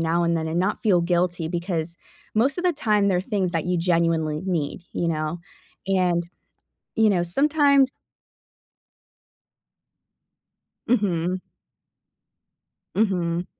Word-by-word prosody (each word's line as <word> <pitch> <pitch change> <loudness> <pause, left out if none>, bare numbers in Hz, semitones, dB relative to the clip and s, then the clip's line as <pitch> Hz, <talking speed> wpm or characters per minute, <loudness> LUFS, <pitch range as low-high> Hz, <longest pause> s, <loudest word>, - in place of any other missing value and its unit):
now 165 +1 +1
and 170 0 +1
then 160 0 -2
and 165 - -1
not 190 +4 0
feel 195 -6 +3
guilty 175 -1 0
because 170 -1 -3 0.4
most 265 +8 +2
of 355 - -3
the 360 - +3
time, 210 -8 +1
they're 180 -2 +2
things 190 -3 -1
that 165 -2 -1
you 180 -1 0
genuinely 165 -2 +1
need, 175 -3 -2
you 170 - -1
know, 155 +1 -2 0.5
and, 180 -3 +1 0.7
you 220 -1 +4
know, 175 -3 +2
sometimes 280 - +3 3.0
Mhm. 185 -6 +1 1.6
Mhm. 180 -4 0
180 Hz, 115 wpm, -24 LUFS, 170-205 Hz, 3.0 s, you